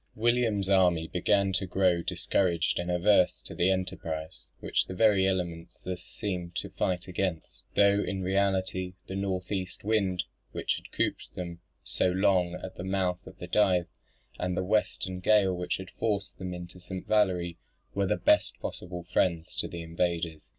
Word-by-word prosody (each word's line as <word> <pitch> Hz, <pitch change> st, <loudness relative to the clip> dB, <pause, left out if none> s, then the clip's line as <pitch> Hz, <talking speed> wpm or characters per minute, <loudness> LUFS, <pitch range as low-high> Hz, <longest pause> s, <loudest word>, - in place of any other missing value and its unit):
William's 115 Hz, -3 st, +2 dB
army 90 Hz, -4 st, +4 dB
began 95 Hz, +2 st, +2 dB
to 95 Hz, 0 st, 0 dB
grow 90 Hz, -2 st, +3 dB
discouraged 85 Hz, 0 st, +1 dB
and 85 Hz, 0 st, -3 dB
averse 90 Hz, +1 st, +4 dB
to -, -, -6 dB
the 90 Hz, -, +2 dB
enterprise, 80 Hz, -4 st, -3 dB
which -, -, 0 dB
the 95 Hz, -, -6 dB
very 100 Hz, -3 st, +4 dB
elements 85 Hz, -3 st, -2 dB
thus 90 Hz, 0 st, -4 dB
seemed 90 Hz, -3 st, -4 dB
to 95 Hz, +1 st, -3 dB
fight 90 Hz, -1 st, -1 dB
against; 90 Hz, -3 st, -3 dB
though 100 Hz, 0 st, +5 dB
in 95 Hz, 0 st, -2 dB
reality 95 Hz, -1 st, 0 dB
the -, -, -7 dB
north 95 Hz, -1 st, -2 dB
east 95 Hz, -3 st, -2 dB
wind 100 Hz, -4 st, +1 dB, 0.3 s
which -, -, 0 dB
had -, -, -12 dB
cooped -, -, -2 dB
them 85 Hz, -2 st, -5 dB, 0.2 s
so 95 Hz, -, +1 dB
long 90 Hz, -1 st, +2 dB
at 95 Hz, +1 st, -8 dB
the -, -, -5 dB
mouth 95 Hz, -1 st, 0 dB
of 95 Hz, -1 st, -11 dB
the 90 Hz, -, -6 dB
Dive, 90 Hz, -2 st, +3 dB, 0.5 s
and 90 Hz, 0 st, -1 dB
the -, -, +1 dB
western 95 Hz, -2 st, 0 dB
gale 95 Hz, -1 st, +4 dB
which 90 Hz, 0 st, -2 dB
had 95 Hz, -1 st, -9 dB
forced 100 Hz, -3 st, -2 dB
them 90 Hz, -1 st, -4 dB
into 90 Hz, 0 st, -7 dB
St. 90 Hz, +1 st, -6 dB
Valery, 90 Hz, -5 st, +1 dB, 0.3 s
were 100 Hz, -1 st, +1 dB
the -, -, +1 dB
best -, -, +3 dB
possible 90 Hz, -1 st, -5 dB
friends 85 Hz, -3 st, +1 dB
to -, -, 0 dB
the 85 Hz, -1 st, -6 dB
invaders. 85 Hz, -1 st, -2 dB
95 Hz, 170 wpm, -29 LUFS, 90-95 Hz, 0.5 s, though